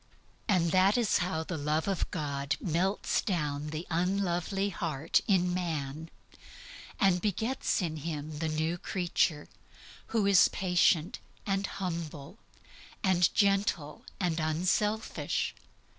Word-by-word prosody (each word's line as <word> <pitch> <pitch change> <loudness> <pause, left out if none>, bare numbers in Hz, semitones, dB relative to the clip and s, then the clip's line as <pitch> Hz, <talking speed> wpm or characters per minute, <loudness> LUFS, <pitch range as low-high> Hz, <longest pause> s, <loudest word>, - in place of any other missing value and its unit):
And 175 -6 +2
that 190 +4 +4
is 230 -4 +2
how 175 -3 -1
the 160 -1 -4
love 150 +3 0
of 195 -3 -1
God 140 -2 -2
melts 185 +4 0
down 150 -6 -2
the 155 +3 -5
unlovely 185 +2 0
heart 160 -5 0
in 180 -4 +3
man, 160 -3 -3 0.9
and 185 -3 +3
begets 220 +2 0
in 160 -2 -2
him 150 -1 -5
the 160 -1 -1
new 160 +3 -1
creature, 175 -4 0 0.6
who 225 -3 +1
is 200 -2 +6
patient 180 -3 +2 0.3
and 195 0 0
humble 170 -1 -5 0.6
and 180 -3 +4
gentle 195 -7 +1 0.2
and 170 -3 0
unselfish. 185 +7 0
175 Hz, 115 wpm, -30 LUFS, 155-195 Hz, 0.9 s, is